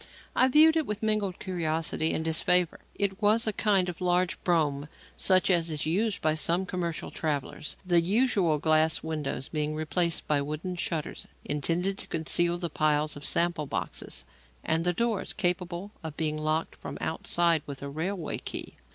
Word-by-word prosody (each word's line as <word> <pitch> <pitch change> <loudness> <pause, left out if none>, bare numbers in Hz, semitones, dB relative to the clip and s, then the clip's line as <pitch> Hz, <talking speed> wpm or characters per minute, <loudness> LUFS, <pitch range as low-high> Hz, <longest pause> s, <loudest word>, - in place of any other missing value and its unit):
I 255 - +5
viewed 310 +4 +6
it 315 - 0
with 210 +1 -4
mingled 215 -4 0
curiosity 160 -3 -1
and 160 - -2
disfavour. 175 +2 +2 0.2
It 200 0 -1
was 215 +3 +4
a 215 - 0
kind 195 -3 +2
of 180 0 -6
large 180 0 +1
brougham, 150 -5 +1 0.3
such 185 0 +4
as 170 -2 +2
is 155 -2 -2
used 200 +6 0
by 155 0 +3
some 170 +4 +1
commercial 175 -3 -3
travellers, 150 -1 -3
the 175 -2 +4
usual 195 -4 +2
glass 155 +1 +2
windows 150 -4 -3
being 155 -1 -1
replaced 165 +2 0
by 145 -2 +2
wooden 155 +6 -4
shutters 165 -3 -4 0.2
intended 170 +7 0
to - - -5
conceal 170 +2 0
the 175 -1 -2
piles 155 -1 +1
of 145 - -9
sample 170 -3 +1
boxes, - - -4 0.4
and 165 +1 0
the 175 - +2
doors 225 +2 -1
capable 180 0 -1
of 160 -1 -6
being 155 -1 0
locked 155 +1 -1
from - - -7
outside 165 0 +1
with 140 -1 -7
a - - -4
railway 165 +4 -3
key. - - -6
170 Hz, 170 wpm, -28 LUFS, 155-185 Hz, 0.4 s, viewed